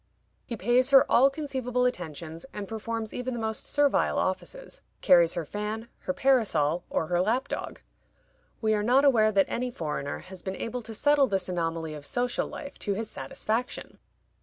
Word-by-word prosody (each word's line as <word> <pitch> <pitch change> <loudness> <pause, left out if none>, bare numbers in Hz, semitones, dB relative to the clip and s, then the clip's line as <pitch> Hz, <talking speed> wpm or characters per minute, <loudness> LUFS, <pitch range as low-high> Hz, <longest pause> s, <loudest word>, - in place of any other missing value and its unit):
He 235 - -4
pays 245 +6 +3
her 275 -1 +7
all 265 +3 +6
conceivable 260 -4 -2
attentions, 165 - -4
and 205 -1 -5
performs 225 0 -4
even 250 0 -3
the - - -4
most 220 -1 -3
servile 290 -1 +2
offices; 190 - -3 0.2
carries 170 -2 +5
her 170 -2 -2
fan, 210 +5 -4
her - - -3
parasol, 185 - +2
or - - 0
her 175 +2 +1
lapdog. 245 +8 -2 0.8
We 220 -1 +2
are 210 - +1
not 255 +6 +4
aware 220 -6 +5
that 195 -2 +4
any 250 +1 -2
foreigner 150 - -4
has 185 0 -10
been 190 -1 -4
able 245 +2 -4
to 225 -1 -8
settle 290 +2 +4
this 195 -4 -1
anomaly 165 -2 -2
of 145 -1 -8
social 245 0 0
life 285 -2 -9
to 200 -2 -1
his 220 +1 -4
satisfaction. 220 - -4
220 Hz, 170 wpm, -28 LUFS, 180-250 Hz, 0.8 s, her